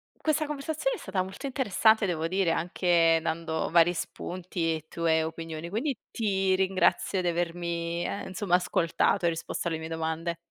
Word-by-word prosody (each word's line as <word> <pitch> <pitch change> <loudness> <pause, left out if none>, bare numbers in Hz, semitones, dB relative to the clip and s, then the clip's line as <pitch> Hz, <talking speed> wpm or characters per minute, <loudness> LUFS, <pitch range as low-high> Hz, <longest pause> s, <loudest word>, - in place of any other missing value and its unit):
questa 310 0 0
conversazione 310 - -2
è - - -10
stata 190 -1 -2
molto 190 +9 -6
interessante, 220 -4 +3
devo 165 -3 -1
dire, 185 -2 +2
anche 170 -1 +3
dando 160 0 -2
vari 170 +1 +5
spunti 175 -1 -3
e 155 -1 -8
tue 160 -1 +1
opinioni, 165 0 -5
quindi 240 - -2
ti 195 -4 +1
ringrazio 190 0 +2
di 175 - -1
avermi, 170 0 -2
ehm, 200 - -4
insomma 190 -1 +1
ascoltato 175 -1 +1
e - - +5
risposto 165 +1 -3
alle 160 -1 -1
mie 160 0 -6
domande. 165 +1 -2
175 Hz, 160 wpm, -28 LUFS, 165-195 Hz, -, vari